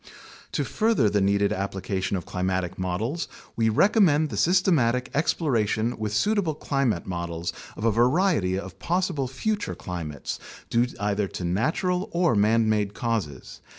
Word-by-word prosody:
To - - 0
further 215 - +2
the 105 -1 +2
needed 100 +1 +2
application 95 0 -2
of 90 - -6
climatic 90 -1 -2
models, 105 - -2 0.3
we 115 -1 +2
recommend 155 - +4
the - - -3
systematic 155 -9 +2
exploration 120 - +1
with 110 -1 -3
suitable 185 - +1
climate 135 - -1
models 85 -2 -4 0.2
of 105 - -3
a 115 - +4
variety 120 - +2
of 95 -1 -7
possible 175 -6 0
future 205 - -2
climates, 80 -6 -5 0.3
due 120 +1 +3
either 100 0 0
to 90 - -6
natural 180 - 0
or 170 -3 +3
man 110 +2 +3
made 105 -2 0
causes. 105 - -3
110 Hz, 140 wpm, -25 LUFS, 95-155 Hz, 0.3 s, recommend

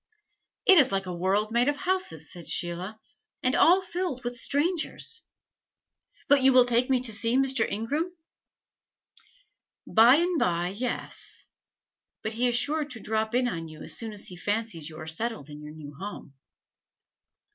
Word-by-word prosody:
"It 380 -3 +8
is 265 -3 +4
like 195 -1 -1
a 180 - -5
world 195 +5 0
made 240 +2 +2
of 290 0 +1
houses," 370 - -1
said 175 -2 -8
Sheila, 180 +5 -3 0.4
"and 255 +1 +2
all 365 +3 +5
filled 350 -8 -4
with 245 0 -3
strangers. 315 - -1 1.1
But 285 -1 +5
you 265 0 +6
will 250 -1 +7
take 245 +1 +1
me 260 -2 +2
to 240 -3 -2
see 230 +3 +1
Mr. 265 -3 +1
Ingram?" 285 - -2 1.7
"By 230 +4 +6
and 345 +1 +1
by, 175 0 +1
yes. 235 +6 -3 0.8
But 220 - -2
he 240 +3 +1
is 240 - +1
sure 300 +5 +2
to 255 -6 -7
drop 220 +1 -1
in 250 0 +2
on 165 -8 -4
you 155 -1 -11
as - - -4
soon 225 -1 -4
as 205 -1 -7
he 180 - -8
fancies 205 -5 -3
you 155 - -11
are 155 - -7
settled 165 - -3
in 150 0 -9
your 150 +1 -10
new 150 -2 -10
home." 190 -2 -8
230 Hz, 170 wpm, -27 LUFS, 180-270 Hz, 1.7 s, It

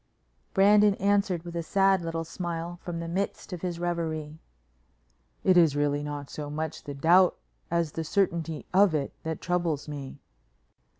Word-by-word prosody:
Brandon 205 +1 +6
answered 200 -3 +1
with 170 -1 -8
a 170 - -1
sad 195 +3 +3
little 165 -1 -3
smile 170 0 -5
from 170 -2 -5
the 170 - -4
midst 190 +2 -3
of 175 - -6
his 175 -2 -3
reverie. 160 -3 -3 1.0
"It 185 -1 +5
is 160 -5 +5
really 145 0 +1
not 145 -1 -5
so 145 0 -6
much 155 +1 -4
the 145 - -6
doubt 175 +5 +5 0.3
as 170 -2 0
the 165 - -3
certainty 165 -3 -1
of 190 -3 +5
it 140 -2 -2
that 160 0 -4
troubles 175 -5 -1
me." 140 -2 -7
170 Hz, 160 wpm, -28 LUFS, 155-180 Hz, 1.0 s, Brandon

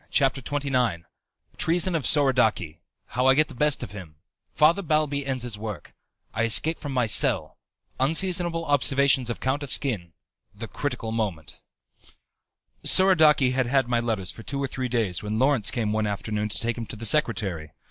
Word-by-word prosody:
CHAPTER 135 -1 +1
XXIX 125 -9 -1 0.5
Treason 175 +2 +1
of 160 -5 -2
Soradaci 125 - +2 0.3
How 125 +1 0
I 130 - +5
Get 155 +1 +2
the - - -10
Best 150 +1 0
of 105 - -8
Him 90 -7 -11 0.4
Father 165 +6 +4
Balbi 150 -4 0
Ends 130 -2 -3
His 115 -4 -7
Work 105 -7 -7 0.4
I 110 - -2
Escape 155 +8 +2
from 145 - -6
My 125 -3 +1
Cell 110 - 0 0.4
Unseasonable 165 +3 -1
Observations 140 -2 +2
of 120 - -4
Count 130 +3 -2
Asquin 115 - -2 0.4
The - - -7
Critical 110 - -4
Moment 95 -10 -4 1.2
Soradaci 155 -8 +6
had 130 -1 0
had 135 0 +1
my 120 -1 0
letters 110 -6 -2
for - - -12
two 140 - -6
or - - -1
three 130 0 -4
days 110 -8 -1
when 105 +1 -4
Lawrence 130 -4 +2
came 110 -3 -2
one 110 0 -1
afternoon 105 +2 -3
to - - +1
take 120 +1 -1
him 115 - -6
to - - -8
the 115 +1 -4
secretary. 100 - +1
125 Hz, 170 wpm, -24 LUFS, 110-145 Hz, 1.2 s, Soradaci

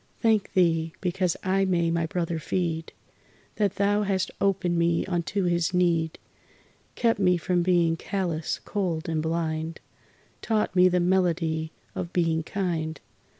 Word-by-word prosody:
Thank 220 -3 +2
Thee 165 -3 +2
because 180 -1 0
I 190 +1 +2
may 170 -3 +1
my 165 -1 0
brother 170 -1 -2
feed, 165 -1 -2 0.7
That 205 -3 +1
Thou 205 +1 +2
hast 195 -2 0
opened 185 -3 +1
me 170 0 +2
unto 190 +2 -1
his 175 0 +1
need, 170 -3 +1 0.8
Kept 230 -3 +2
me 180 -2 +4
from 175 +1 0
being 170 -2 +3
callous, 170 -3 -2
cold 180 -6 -2
and 160 -1 0
blind, 160 0 -2 0.6
Taught 215 -4 0
me 180 0 +6
the 180 0 +2
melody 170 -3 +1 0.2
of 170 - -5
being 165 -2 +1
kind. 165 -3 -2
175 Hz, 140 wpm, -26 LUFS, 165-190 Hz, 0.8 s, me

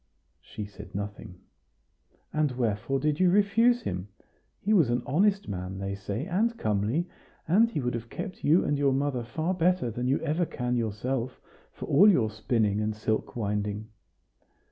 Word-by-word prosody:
She 105 - -7
said 100 -1 -12
nothing. 100 -3 -6 0.9
"And 150 -3 +1
wherefore 120 +2 -1
did 150 +2 0
you 185 -1 +5
refuse 220 +5 +3
him? 90 +1 -3 0.5
He 215 - +1
was 165 - +4
an 120 +1 0
honest 195 +8 +2
man, 95 -1 -5
they 100 0 -3
say, 100 +6 -4
and 220 +6 0
comely; 110 - 0 0.4
and 215 +8 +5
he 160 - -3
would 125 -1 -1
have 115 0 -5
kept 185 - -6
you 160 +5 +4
and 145 -1 0
your 140 -2 +3
mother 135 -2 0
far 155 +10 -2
better 180 -7 +1
than 125 +3 -3
you 135 - +2
ever 160 +3 0
can 125 -1 -2
yourself, 120 +3 -2 0.3
for - - -8
all 195 +10 +6
your 115 - +3
spinning 110 -1 0
and 105 0 -1
silk 110 0 -2
winding." 105 -1 -2
125 Hz, 165 wpm, -28 LUFS, 105-170 Hz, 0.9 s, all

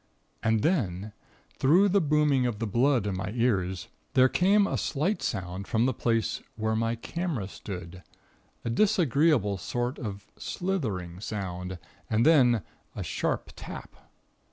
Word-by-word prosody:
And 110 -2 +2
then, 105 - 0 0.5
through 180 +9 +5
the 200 +1 +3
booming 150 -4 +3
of 115 -4 -2
the 115 - -2
blood 120 +2 +2
in 100 -2 -1
my 95 +1 -3
ears, 95 -7 0 0.3
there 130 0 +6
came 200 +6 +4
a - - -1
slight 160 +9 0
sound 95 -1 -3
from 115 +1 +2
the 130 - +2
place 115 -1 0
where 110 0 0
my 115 +1 0
camera 150 - -3
stood 90 -2 -8 0.6
a 115 - 0
disagreeable 145 - +3
sort 120 +8 -2
of 100 -5 -6
slithering 105 - -3
sound, 95 -3 -4 0.3
and 115 +2 +2
then 125 -9 +5 0.3
a - - -3
sharp - - -2
tap. - - -9
115 Hz, 140 wpm, -28 LUFS, 100-150 Hz, 0.6 s, there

